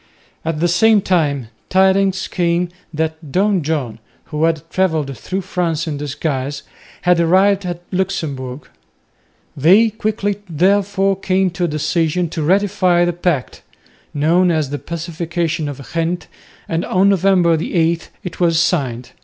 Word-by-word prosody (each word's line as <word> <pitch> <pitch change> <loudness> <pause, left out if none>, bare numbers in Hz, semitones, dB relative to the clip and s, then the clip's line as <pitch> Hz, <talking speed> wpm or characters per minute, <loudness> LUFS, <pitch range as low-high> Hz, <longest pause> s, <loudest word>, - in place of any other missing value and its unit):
At 160 -1 -2
the 175 - +2
same 210 +5 +4
time 145 -9 0 0.2
tidings 190 0 +2
came 175 0 0 0.2
that 160 -1 -3
Don 195 +1 +2
John, 140 -8 -2 0.3
who 150 0 -1
had 160 -2 -1
travelled 160 -7 0
through 190 +9 -4
France 170 -3 -2
in 155 -3 -3
disguise, 145 -1 -3 0.4
had 180 -1 +3
arrived 190 +3 +3
at 175 0 -5
Luxemburg. 150 -9 -3 0.9
They 195 +10 +5
quickly 205 -2 -2
therefore 195 +3 +2
came 190 -1 +1
to 175 +1 -1
a - - 0
decision 165 +2 0
to 165 - -4
ratify 185 0 +2
the 175 - 0
pact, 170 -6 -2 0.5
known 170 +5 +2
as 155 -5 0
the 145 - -3
Pacification 170 -1 -3
of 140 -1 -9
Ghent, 170 +2 -1 0.4
and 165 +1 -1
on 190 +2 +3
November 185 -3 +3
8 165 0 0
it 180 - -7
was 170 -2 +3
signed. 130 -9 -1
170 Hz, 135 wpm, -18 LUFS, 155-185 Hz, 0.9 s, They